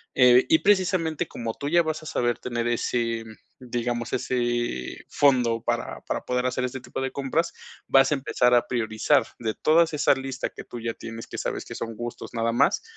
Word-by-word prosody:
eh, 125 -1 +6
y 160 - +6
precisamente 185 -5 +2
como 115 -4 -5
tú 140 - -4
ya 170 +1 +4
vas 155 -1 -3
a - - -11
saber 120 -5 0
tener 120 -1 -2
ese 115 -1 -1 0.4
digamos, 120 -1 -3
ese 120 - -1
fondo 120 -5 +3
para 120 0 -2
para - - -3
poder 125 0 0
hacer 130 0 -1
este 130 +1 -3
tipo 130 - -6
de 130 - -1
compras, 140 +5 -1 0.3
vas 135 +1 +5
a - - +4
empezar 125 -2 +2
a 120 - +4
priorizar, 115 +3 +2 0.2
de 110 -2 -2
todas 165 +1 +3
esas 145 - +4
listas 135 -1 -4
que - - -8
tú 120 - -8
ya 115 0 -3
tienes, 115 0 -8
que - - -7
sabes - - -3
que - - -8
son 115 -1 -5
gustos, 120 +1 -7
nada 115 0 +1
más, 120 - +2
125 Hz, 195 wpm, -25 LUFS, 120-140 Hz, 0.4 s, eh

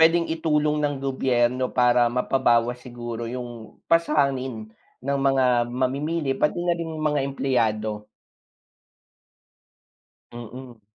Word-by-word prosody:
pwedeng 165 +1 +5
itulong 150 -2 +1
ng 145 -1 0
gobyerno 130 -1 +1
para 125 -1 +3
mapabawas 125 -1 +1
siguro 120 -1 -6
yung 120 -3 -7
pasanin 135 -9 +1 0.3
ng 140 0 0
mga 135 -1 +3 0.2
mamimili, 135 +4 -1
pati 150 - 0
na 175 - +2
rin 170 -1 -4
yung 155 - -4
mga 150 -1 +1
empleyado. 110 -6 -1 2.3
Mm. 120 0 -10
130 Hz, 105 wpm, -24 LUFS, 120-150 Hz, 2.3 s, pwedeng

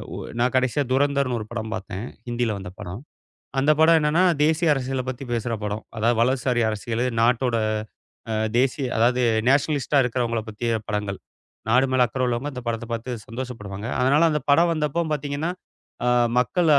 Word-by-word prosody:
ஒ - - -5 0.2
நான் 120 0 +2
கடைசியா 130 +3 +2
துரந்தர்ன்னு 140 -2 +2
ஒரு 105 - -7
படம் 110 -2 -4
பாத்தேன். 100 0 -6 0.2
ஹிந்தில 120 -2 -1
வந்த 95 -2 -7
படம். 100 +2 -7 0.6
அந்தப் 150 +3 +3
படம் 165 +1 +6
என்னன்னா 150 +4 +3 0.2
தேசிய 160 +2 +2
அரசியலைப் 130 -1 -2
பத்தி 130 +1 -9
பேசுற 115 0 -1
படம். 105 +1 -3 0.2
அதாவது 115 +2 +2
வலதுசாரி 125 -1 +1
அரசியல் 115 +2 -2 0.2
நாட்டோட 120 0 +2 0.7
அ - - 0 0.3
தேசிய, 135 +1 +1
அதாவது 125 +3 +3 0.3
நேஷ்னலிஸ்ட்டா 140 0 +2
இருக்கறவங்கள 115 -2 -1
பத்தியான 110 0 -2
படங்கள். 105 -2 -2 0.5
நாடு 125 +4 +5
மேல 125 -1 +5
அக்கறை 130 +2 -3
உள்ளவங்க 125 +4 -2
இந்தப் 125 -2 -7
படத்தைப் 115 0 -4
பாத்து 115 +2 -4 0.2
சந்தோஷப்படுவாங்க. 115 -4 -6
அதனால 145 +6 +4
அந்தப் 150 -1 -2
படம் 170 +4 +5
வந்தப்போ 155 +1 0
பாத்தீங்கன்னா, 145 +2 -2 0.6
அ - - +3 0.3
மக்கள 175 +7 +1
125 Hz, 155 wpm, -24 LUFS, 115-140 Hz, 0.7 s, படம்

